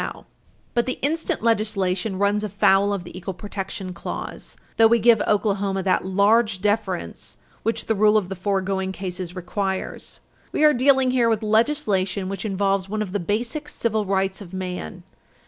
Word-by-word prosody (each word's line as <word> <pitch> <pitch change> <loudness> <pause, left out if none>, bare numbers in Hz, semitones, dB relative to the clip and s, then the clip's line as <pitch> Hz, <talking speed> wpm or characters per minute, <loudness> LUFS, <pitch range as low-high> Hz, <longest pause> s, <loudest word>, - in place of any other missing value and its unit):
541 - - -7 0.4
But 235 - +2
the 255 - -2
instant 320 -6 -2
legislation 205 -3 +1
runs 205 +1 +1
afoul 200 0 +3
of 200 -3 -2
the 175 - -11
equal 185 0 -5
protection 195 -1 -5
clause, 170 - -7 0.2
though 225 - +7
we 235 +1 +4
give 230 0 +5
Oklahoma 200 -2 +1
that 185 0 +2
large 205 +2 +3
deference 205 -2 -2 0.2
which 225 0 -1
the 225 - +1
rule 210 +1 +4
of 200 -4 0
the 195 - -5
foregoing 190 0 -1
cases 185 -1 -5
requires. 190 +1 -3 0.3
We - - 0
are 300 -1 +7
dealing 265 0 +4
here 240 -2 +3
with 220 -1 0
legislation 210 -5 +1
which 195 +2 -4
involves 195 -1 0
one 215 +1 -1
of 190 - -7
the 205 - -1
basic 235 - -2
civil 220 -5 0
rights 195 0 0
of 190 -2 -11
man. 180 - -5
200 Hz, 165 wpm, -23 LUFS, 190-220 Hz, 0.4 s, though